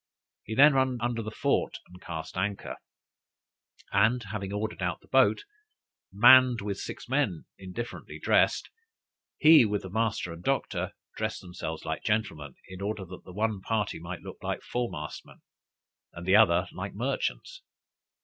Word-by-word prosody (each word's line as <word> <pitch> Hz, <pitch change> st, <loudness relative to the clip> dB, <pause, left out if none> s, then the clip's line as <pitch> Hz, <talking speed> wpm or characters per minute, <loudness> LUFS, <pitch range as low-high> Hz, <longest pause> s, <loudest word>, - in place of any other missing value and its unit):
He 110 Hz, -, -6 dB
then 145 Hz, +4 st, +7 dB
ran 130 Hz, -2 st, +2 dB
under 120 Hz, 0 st, -1 dB
the 110 Hz, -, -5 dB
fort 110 Hz, -, 0 dB
and 90 Hz, +1 st, -16 dB
cast 80 Hz, -3 st, -6 dB
anchor, 100 Hz, +2 st, -3 dB, 1.1 s
and 110 Hz, +5 st, +3 dB
having 100 Hz, -1 st, -5 dB
ordered 105 Hz, +1 st, -3 dB
out -, -, -1 dB
the -, -, -23 dB
boat, -, -, +3 dB, 0.7 s
manned 120 Hz, +4 st, +7 dB
with 100 Hz, -1 st, -4 dB
six -, -, -7 dB
men 130 Hz, -, 0 dB
indifferently 95 Hz, +5 st, -7 dB
dressed, -, -, +2 dB, 0.7 s
he, 155 Hz, -2 st, +8 dB
with 105 Hz, -2 st, -1 dB
the 95 Hz, -, -8 dB
master 110 Hz, -5 st, -1 dB
and 85 Hz, +1 st, -11 dB
doctor, -, -, -1 dB, 0.2 s
dressed -, -, -3 dB
themselves 90 Hz, -1 st, -6 dB
like -, -, -3 dB
gentlemen, 80 Hz, -10 st, -2 dB
in 95 Hz, 0 st, -10 dB
order 100 Hz, -1 st, -3 dB
that 90 Hz, +1 st, -11 dB
the -, -, -10 dB
one 105 Hz, +1 st, -1 dB
party 105 Hz, -4 st, -1 dB
might 90 Hz, +2 st, -7 dB
look -, -, -9 dB
like -, -, -3 dB
foremastmen, 115 Hz, -12 st, -5 dB, 0.7 s
and 85 Hz, -, -8 dB
the 95 Hz, +2 st, +4 dB
other 90 Hz, -4 st, +5 dB
like 95 Hz, +2 st, -6 dB
merchants. 140 Hz, -, -3 dB
105 Hz, 150 wpm, -28 LUFS, 95-120 Hz, 1.1 s, he